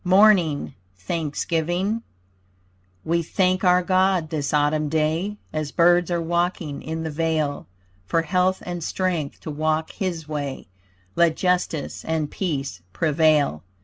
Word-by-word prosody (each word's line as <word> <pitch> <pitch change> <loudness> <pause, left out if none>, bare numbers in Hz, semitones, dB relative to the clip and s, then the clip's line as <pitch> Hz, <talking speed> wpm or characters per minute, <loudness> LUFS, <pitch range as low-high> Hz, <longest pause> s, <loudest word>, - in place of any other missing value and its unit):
MORNING 185 -5 +4 0.2
THANKSGIVING 170 - -1 1.0
We 170 +1 +1
thank 185 +3 +1
our 180 0 +4
God 185 -3 +2
this 145 -3 -2
Autumn 150 0 +2
day, 160 +7 0 0.2
As 155 -2 -2
birds 175 0 +4
are 175 -1 0
waking 170 -3 -1
in 160 +1 -4
the 160 - -3
vale, 155 -2 -1 0.4
For 165 - +1
health 185 +2 +1
and 175 -2 -4
strength 170 -5 -2
to 155 - -5
walk 155 +1 -1
his 170 -5 -4
way, 145 - -4 0.5
Let 170 -2 +4
justice 180 -5 -1
and 160 -2 -2
peace 135 - -3
prevail. 155 - +2
165 Hz, 125 wpm, -23 LUFS, 155-180 Hz, 1.0 s, MORNING